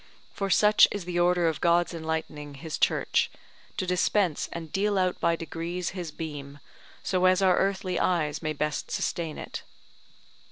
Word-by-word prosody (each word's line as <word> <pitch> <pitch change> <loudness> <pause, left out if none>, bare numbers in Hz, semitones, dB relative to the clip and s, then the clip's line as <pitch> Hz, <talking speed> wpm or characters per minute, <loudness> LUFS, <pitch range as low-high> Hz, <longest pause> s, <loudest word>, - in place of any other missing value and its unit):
For 195 -2 -2
such 210 +3 +6
is 205 -4 -5
the 175 -1 -2
order 175 -1 +3
of 160 - -2
God's 175 0 +3
enlightening 160 -3 -4
his 160 +3 -6
Church, - - +2 0.5
to - - -1
dispense 180 -1 +1
and 165 -2 -7
deal 200 +1 +1
out 185 -1 +1
by 170 - +2
degrees 170 +2 -4
his 180 -3 -5
beam, 145 -3 -7 0.5
so 185 -1 +1
as 185 +1 +4
our 185 -1 +4
earthly 190 -2 0
eyes 160 -5 0
may 155 -2 -2
best 150 0 -2
sustain 165 -3 -2
it. - - -6
175 Hz, 160 wpm, -27 LUFS, 160-185 Hz, 0.5 s, such